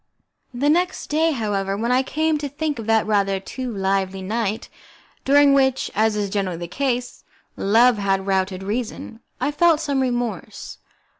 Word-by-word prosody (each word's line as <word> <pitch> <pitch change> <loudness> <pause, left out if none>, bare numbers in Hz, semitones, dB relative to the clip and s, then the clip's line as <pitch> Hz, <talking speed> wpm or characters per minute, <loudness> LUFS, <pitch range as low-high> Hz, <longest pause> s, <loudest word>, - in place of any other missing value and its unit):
The 260 +3 -1
next 355 +1 -1
day, 320 +2 +3
however, 200 -6 -2
when 235 +3 -1
I 255 +1 +4
came 310 +3 0
to 290 -1 -4
think 295 -1 -3
of 225 - -7
that 225 -1 +3
rather 200 -2 +1
too 255 +6 -6
lively 195 -1 -1
night, 220 +1 -2 0.6
during 285 +1 +5
which, 265 -1 +2
as 215 +1 +2
is 205 -2 -2
generally 195 -4 -2
the 175 0 -6
case, 250 +4 -3 0.3
Love 225 +3 +4
had 195 -1 0
routed 190 -1 -1
Reason, 225 +1 -4 0.2
I 290 - 0
felt 330 0 +3
some 285 -4 -1
remorse. 245 -3 -4
230 Hz, 160 wpm, -22 LUFS, 195-275 Hz, 0.6 s, during